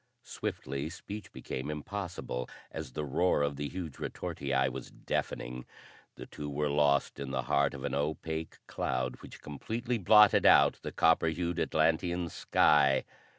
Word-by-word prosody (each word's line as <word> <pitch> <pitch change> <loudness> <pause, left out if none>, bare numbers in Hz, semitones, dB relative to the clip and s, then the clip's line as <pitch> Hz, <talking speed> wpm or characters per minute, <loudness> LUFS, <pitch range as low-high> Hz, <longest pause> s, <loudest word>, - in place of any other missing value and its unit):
Swiftly 70 +3 -4
speech 100 +3 -8
became 65 +3 -5
impossible, 75 -5 -4 0.2
as 75 -5 -6
the 75 - -3
roar 75 +2 +2
of 70 0 -1
the 75 +1 -3
huge 85 -7 -6
retortii 65 -1 -1
was 65 0 -6
deafening; 60 +1 -4 0.5
the - - -9
two 75 0 -7
were 75 +1 -1
lost 70 -1 +2
in 70 -1 -4
the 65 -1 -2
heart 70 +2 +1
of 70 - -8
an - - -2
opaque 80 +2 -3
cloud 65 0 -2
which - - -13
completely 115 - -3
blotted 105 +1 +6
out - - +6
the - - -5
copper 80 0 +3
hued 85 +1 -1
Atlantean 85 +2 +1
sky. 70 -4 +3
75 Hz, 150 wpm, -31 LUFS, 70-85 Hz, 0.5 s, blotted